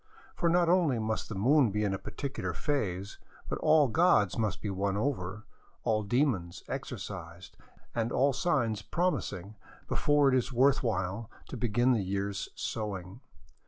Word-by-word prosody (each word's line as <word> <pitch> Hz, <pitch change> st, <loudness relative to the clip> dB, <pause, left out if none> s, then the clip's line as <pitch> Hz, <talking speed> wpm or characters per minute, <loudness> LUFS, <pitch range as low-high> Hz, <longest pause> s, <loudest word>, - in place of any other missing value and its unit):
For 170 Hz, -, +1 dB
not 175 Hz, 0 st, +3 dB
only 170 Hz, -7 st, +3 dB
must 110 Hz, 0 st, -2 dB
the 110 Hz, -, -5 dB
moon 130 Hz, +6 st, +4 dB
be 105 Hz, +1 st, -1 dB
in 100 Hz, -2 st, 0 dB
a 95 Hz, -, -3 dB
particular 140 Hz, -1 st, -4 dB
phase, 100 Hz, -, -2 dB, 0.3 s
but -, -, -3 dB
all 155 Hz, -2 st, +5 dB
gods 120 Hz, -, +3 dB
must 110 Hz, -5 st, -1 dB
be 105 Hz, -, -3 dB
won 100 Hz, +1 st, -1 dB
over, 110 Hz, -4 st, -2 dB, 0.4 s
all 110 Hz, -1 st, +1 dB
demons 105 Hz, -, 0 dB
exorcised, 85 Hz, +2 st, -7 dB, 0.4 s
and 115 Hz, 0 st, -1 dB
all 140 Hz, +1 st, +3 dB
signs 125 Hz, -, 0 dB
promising, 105 Hz, -, -2 dB, 0.3 s
before 145 Hz, -1 st, +3 dB
it -, -, +1 dB
is 125 Hz, +1 st, 0 dB
worth 135 Hz, +3 st, +4 dB
while 105 Hz, -1 st, -2 dB, 0.2 s
to -, -, -5 dB
begin 120 Hz, +1 st, +2 dB
the 115 Hz, -, +1 dB
year's 100 Hz, +1 st, -2 dB
sowing. 100 Hz, 0 st, -4 dB
110 Hz, 155 wpm, -30 LUFS, 100-140 Hz, 0.4 s, all